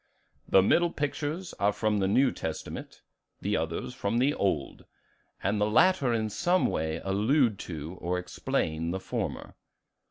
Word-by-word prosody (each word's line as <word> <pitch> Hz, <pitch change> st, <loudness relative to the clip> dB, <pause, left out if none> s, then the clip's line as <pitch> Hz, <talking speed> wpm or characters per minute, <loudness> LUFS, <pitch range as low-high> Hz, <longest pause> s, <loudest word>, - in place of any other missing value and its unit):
"The 95 Hz, -, +6 dB
middle 170 Hz, -, +4 dB
pictures 155 Hz, +4 st, -3 dB
are 100 Hz, +1 st, +3 dB
from 105 Hz, 0 st, 0 dB
the 95 Hz, -, +2 dB
New 130 Hz, +7 st, +4 dB
Testament, 80 Hz, -1 st, -6 dB, 0.4 s
the -, -, -1 dB
others 80 Hz, +9 st, -2 dB
from 115 Hz, -2 st, -1 dB
the 135 Hz, +4 st, +3 dB
Old; 80 Hz, -, -2 dB, 0.6 s
and 105 Hz, +1 st, +1 dB
the 105 Hz, -, +2 dB
latter 155 Hz, +1 st, +4 dB
in 110 Hz, -2 st, 0 dB
some 175 Hz, -, +2 dB
way 80 Hz, +1 st, -1 dB
allude 110 Hz, +4 st, +2 dB
to 80 Hz, +2 st, -6 dB
or 90 Hz, +1 st, -1 dB
explain 80 Hz, -2 st, -2 dB
the 95 Hz, +2 st, -2 dB
former." -, -, -4 dB
105 Hz, 150 wpm, -28 LUFS, 90-135 Hz, 0.6 s, The